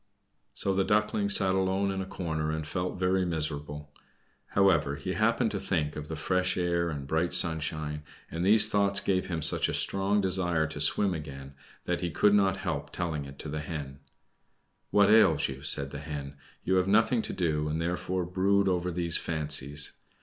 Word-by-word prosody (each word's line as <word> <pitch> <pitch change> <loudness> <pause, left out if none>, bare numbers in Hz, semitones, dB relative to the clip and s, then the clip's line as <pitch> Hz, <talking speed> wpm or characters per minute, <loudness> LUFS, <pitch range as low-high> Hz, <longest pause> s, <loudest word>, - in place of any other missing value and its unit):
So 95 - -1
the 95 0 +1
Duckling 105 0 0
sat 95 -1 +4
alone 95 +1 0
in 95 0 -3
a 95 - -6
corner, 80 -5 -3
and 80 0 -3
felt 90 +5 -4
very 95 +1 +1
miserable. 75 -3 -5 0.5
However, 85 -8 +2
he - - -5
happened - - +1
to - - -3
think 75 -1 -2
of 75 0 -7
the 80 - -5
fresh 90 +4 -1
air 85 -1 0
and 75 -4 -5
bright 80 +5 0
sunshine, 75 -2 -1 0.3
and 85 +1 -3
these 105 +3 +6
thoughts 100 -1 +2
gave 95 -2 -1
him 85 -4 -3
such - - +2
a - - -2
strong 100 +1 +1
desire 90 -4 +1
to 80 - -4
swim 100 -3 +3
again, 70 -4 -8 0.3
that - - -2
he 90 - -2
could 100 +6 +2
not 95 -2 +2
help 80 -7 -4
telling 80 -5 -4
it 70 0 -11
to - - -6
the 75 +1 -4
Hen. 75 -3 -7 0.9
"What 100 0 +4
ails 95 -9 +4
you?" 65 0 -8
said 70 -1 +3
the 70 - -6
Hen. 75 -2 -7 0.3
"You 95 0 +1
have 90 0 +1
nothing 110 +3 +3
to - - -4
do, 75 -4 -1
and 75 +1 -2
therefore 90 +2 -2
brood 95 +2 +1
over 90 -1 0
these 85 -1 +2
fancies. 75 -2 0
85 Hz, 185 wpm, -28 LUFS, 75-95 Hz, 0.9 s, these